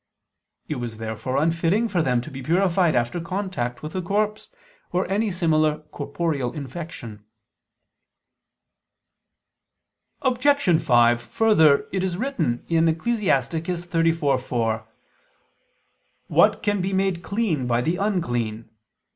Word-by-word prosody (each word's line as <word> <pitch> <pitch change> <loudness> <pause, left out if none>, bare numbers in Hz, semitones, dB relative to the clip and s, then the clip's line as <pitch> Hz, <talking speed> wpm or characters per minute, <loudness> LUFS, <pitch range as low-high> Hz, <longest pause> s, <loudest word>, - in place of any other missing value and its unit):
It 150 - -3
was 120 -3 -5
therefore 110 +4 -3
unfitting 165 +8 +2
for 185 -6 0
them 125 -5 +1
to 155 - -9
be 135 0 -7
purified 175 +2 +2
after 120 +8 0
contact 170 -10 -3
with 155 - -6
a 185 - -2
corpse, 210 +4 -1 0.4
or 180 +1 0
any 205 +4 0
similar 155 -4 +2
corporeal 145 -3 -2
infection. 130 -7 -8 3.0
Obj. 255 - +3
5: 120 0 +4
Further, 160 - +3
it 190 - -1
is 180 -2 -2
written 175 - -2
(Ecclus. 165 +8 +1 0.3
34:4): 160 - 0 1.4
"What - - +3
can 205 -2 +1
be 190 +2 -2
made 190 -2 0
clean 185 - -1
by 120 0 +1
the 165 +7 0
unclean?" 120 - -2
165 Hz, 110 wpm, -23 LUFS, 125-190 Hz, 3.0 s, 5